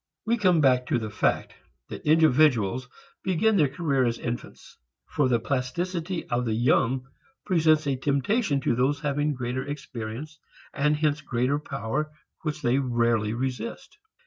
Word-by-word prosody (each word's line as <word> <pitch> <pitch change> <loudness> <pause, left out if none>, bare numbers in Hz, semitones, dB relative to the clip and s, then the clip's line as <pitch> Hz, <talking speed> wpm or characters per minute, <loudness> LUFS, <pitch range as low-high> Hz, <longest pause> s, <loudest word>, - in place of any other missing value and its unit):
We 230 +1 +2
come 185 -7 +3
back 125 -2 +3
to - - +1
the 110 -3 -4
fact 110 - 0 0.4
that - - -8
individuals 130 -7 +3 0.3
begin 200 +4 +2
their 150 -7 +4
career 140 -3 0
as 115 -1 0
infants. 120 0 -6 0.3
For - - 0
the 120 -2 +3
plasticity 165 - -2
of 120 +1 0
the 110 -2 0
young 125 +2 +2 0.4
presents 160 -4 +3
a 140 -2 0
temptation 140 - +1
to - - +1
those 135 +4 +1
having 145 0 0
greater 125 +1 -3
experience 140 +1 -7 0.3
and 150 +1 +2
hence 150 -1 +1
greater 130 +1 0
power 140 +1 -3 0.3
which 150 -1 -4
they 125 +2 +3
rarely 115 -4 +1
resist. 130 - -5
140 Hz, 145 wpm, -26 LUFS, 125-155 Hz, 0.4 s, their